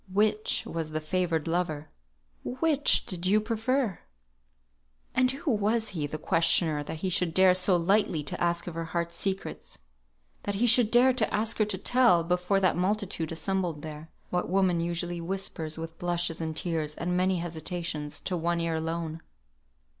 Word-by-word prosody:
Which 210 +2 +1
was 165 -2 -4
the 155 0 -2
favoured 165 0 -1
lover? 165 -3 -2 0.5
Which 290 +2 +2
did 185 -1 -3
you 210 +3 +4
prefer?" 225 0 -1 1.1
And 255 0 +3
who 275 +3 -2
was 220 +1 +1
he, 160 -7 -3
the 155 - -5
questioner, 165 -1 +2
that 155 +2 -6
he - - +1
should 170 -2 +1
dare 185 -1 +6
so 185 0 +3
lightly 175 -3 +2
to 145 - -5
ask 170 0 0
of 175 - -6
her 165 0 -4
heart's 170 +1 -3
secrets? 195 +1 -4 0.6
That 205 - -3
he 225 +5 +2
should 235 -1 +5
dare 250 +2 +5
to 230 -4 0
ask 220 +3 0
her 215 - +4
to 205 -2 -2
tell, 230 -4 +4
before 180 +3 +1
that 185 - +3
multitude 185 -3 -1
assembled 170 -2 -2
there, 155 0 -8 0.2
what 180 0 -1
woman 185 -2 +2
usually 170 0 -2
whispers 165 -3 -3
with 165 0 -7
blushes 175 -2 -1
and 160 -1 -3
tears, 155 -3 -2
and 180 +1 -2
many 185 +1 +2
hesitations, 165 -2 -4
to 185 - -2
one 170 0 0
ear 165 -1 -1
alone? 160 0 -3
175 Hz, 170 wpm, -28 LUFS, 165-205 Hz, 1.1 s, dare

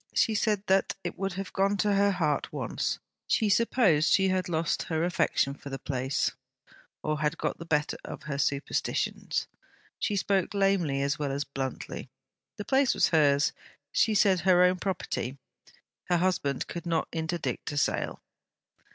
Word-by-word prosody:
She 225 - +3
said 210 -2 +1
that 190 -1 +2
it 175 - -4
would 195 -1 -1
have 195 +1 -6
gone 200 +1 +2
to 205 0 +2
her 200 0 +4
heart 165 -6 0
once; - - -2 0.3
she 215 - +2
supposed 200 -7 +3
she 190 -1 +4
had 185 -1 0
lost 165 -1 0
her 160 -1 0
affection 170 -5 +1
for 140 - -10
the 135 - -4
place, 130 0 -1 0.7
or 155 -1 -1
had 150 +2 0
got - - -2
the 170 - -8
better 150 -2 0
of - - -8
her 140 -2 -4
superstitions. 140 +1 -1 0.5
She 210 - 0
spoke 195 0 0
lamely 185 -9 +2
as 140 +1 -1
well 145 -2 -1
as 140 +1 -1
bluntly. 135 -2 -5 0.5
The 205 - -5
place 270 -1 +3
was - - +3
hers, 145 -3 +3 0.4
she 220 +7 +2
said; 195 -2 +4
her 180 0 +5
own 180 0 +3
property. 150 - -3 0.7
Her 175 - +2
husband 170 -6 0
could 170 0 -6
not 165 -1 0
interdict 165 -1 -3
a 145 - -4
sale. 145 - -1
175 Hz, 165 wpm, -28 LUFS, 150-195 Hz, 0.7 s, her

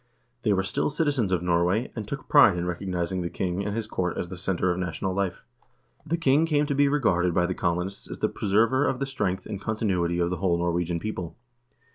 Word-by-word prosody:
They 105 - +1
were 95 -1 +2
still 95 - 0
citizens 145 - 0
of 90 -2 +1
Norway, 90 +6 +1
and 110 -3 -5
took 140 +4 -6
pride 120 -11 +6
in 85 - -2
recognizing 90 0 -2
the 85 - -2
king 90 +2 -2
and 105 +1 -3
his 115 -1 -2
court 90 -4 -2
as 90 - -3
the 95 - -6
center 90 0 0
of 90 - -2
national 90 +1 -2
life. 95 -1 -2 0.6
The 170 - 0
king 155 0 +3
came 150 -2 +2
to 145 - -1
be 140 +1 +4
regarded 90 - +2
by 90 - +3
the 90 - -1
colonists 90 +2 -2
as - - -6
the - - +1
preserver 115 +7 +2
of 130 - 0
the 135 - -1
strength 95 -9 -2
and 100 - -6
continuity 95 -6 0
of 85 0 +1
the 90 - -1
whole 85 -1 +1
Norwegian 85 0 -1
people. 90 -3 -5
95 Hz, 220 wpm, -26 LUFS, 90-115 Hz, 0.6 s, pride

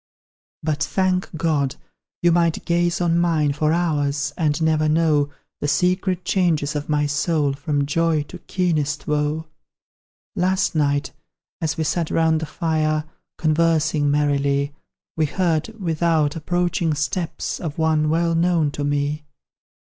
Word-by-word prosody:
But, 150 -2 -1
thank 185 +1 0
God! 145 -4 0 0.5
you 175 - +5
might 170 -1 +1
gaze 175 0 +1
on 170 -1 +2
mine 160 -4 +2
For 150 +1 +1
hours, 150 -4 0
and 155 -3 0
never 155 -1 +2
know 155 -2 +2 0.3
The 145 - -2
secret 180 +3 +1
changes 160 -6 +1
of 150 +1 -4
my 150 -1 +2
soul 145 0 +1
From 145 0 -1
joy 160 +1 +1
to 180 +5 -11
keenest 155 -7 -1
woe. 150 +1 -1 0.9
Last 185 +2 +1
night, 145 -2 +1 0.5
as 160 -2 -1
we 160 - 0
sat 165 +1 -1
round 160 -1 +2
the 160 - -4
fire 155 -1 0 0.3
Conversing 155 -2 +2
merrily, 140 -1 +1 0.4
We 155 -1 +1
heard, 165 -2 0
without, 165 -4 +1
approaching 175 -1 0
steps 160 +3 -2
Of 155 -4 -5
one 155 -1 +2
well 165 +1 +1
known 165 -3 +2
to 145 - -4
me! 145 +1 -1
155 Hz, 135 wpm, -22 LUFS, 145-170 Hz, 0.9 s, you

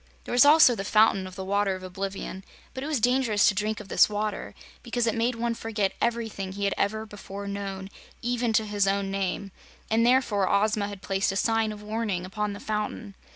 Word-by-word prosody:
There - - -8
was 245 +2 +6
also 295 -3 +7
the 195 - -4
Fountain 205 -2 +3
of 185 - -11
the 190 0 -6
Water 200 0 +1
of 185 - -9
Oblivion, 190 0 -5 0.3
but 260 - -5
it - - -4
was 305 -4 0
dangerous 245 -3 +3
to - - +4
drink 210 +2 -2
of 210 - -10
this - - +4
water, 210 0 -3 0.3
because 240 0 -1
it 225 - +1
made 235 +2 0
one 235 0 -1
forget 215 -4 -2
everything 225 -5 -2
he 200 +1 -5
had 200 - +1
ever 215 +2 -1
before 200 -1 -8
known, 195 -1 -5 0.3
even 240 -1 -1
to 220 0 +2
his 205 -1 0
own 195 0 0
name, 195 0 -2 0.4
and 225 +1 +3
therefore 235 -6 +3
Ozma 210 +1 +2
had 200 -2 -9
placed 195 0 0
a - - -5
sign 225 +1 +1
of 210 0 -9
warning 210 -4 -2
upon 210 +2 -3
the 200 - -8
fountain. 210 0 -4
210 Hz, 210 wpm, -26 LUFS, 195-225 Hz, 0.4 s, also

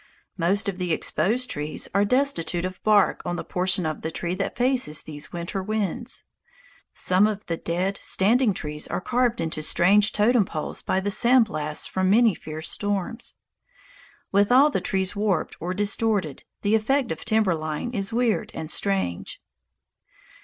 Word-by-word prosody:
Most 190 +4 +1
of 190 -2 -3
the 180 -2 -2
exposed 235 +9 0
trees 150 +1 -3
are 200 +1 +3
destitute 200 -9 +1
of 185 0 -6
bark 210 -2 +3
on 175 0 -3
the - - -4
portion 180 -1 0
of 155 -1 -3
the 160 - -3
trunk 175 +3 -3
that 195 - -2
faces 245 - +1
these 150 -1 -9
winter 175 +3 -4
winds. 210 -2 -3 0.7
Some 185 +3 +3
of 210 -1 -4
the 170 - -2
dead 180 +4 -2
standing 225 +4 +3
trees 150 -2 -4
are - - -2
carved 245 +3 0
into 160 -1 -2
strange 200 +7 +4
totem 220 +2 +3
poles 155 -5 -5
by 190 - 0
the 205 +1 -2
sand 240 +3 +5
blasts 150 -5 -2
of 190 - +1
many 220 +2 +5
fierce 155 -1 -6
storms. 205 +2 -3 1.0
With 200 +3 +3
all 275 +4 +6
the - - -1
trees 190 -1 -1
warped 200 -5 0
or 175 +2 -3
distorted, 205 - 0 0.2
the 205 - +1
effect 245 +3 +1
of 160 - -5
timber 220 -4 +2
line 155 +7 -4
is 200 -3 -3
weird 225 -2 0
and 160 0 -5
strange. 195 - -2
195 Hz, 165 wpm, -24 LUFS, 170-220 Hz, 1.0 s, all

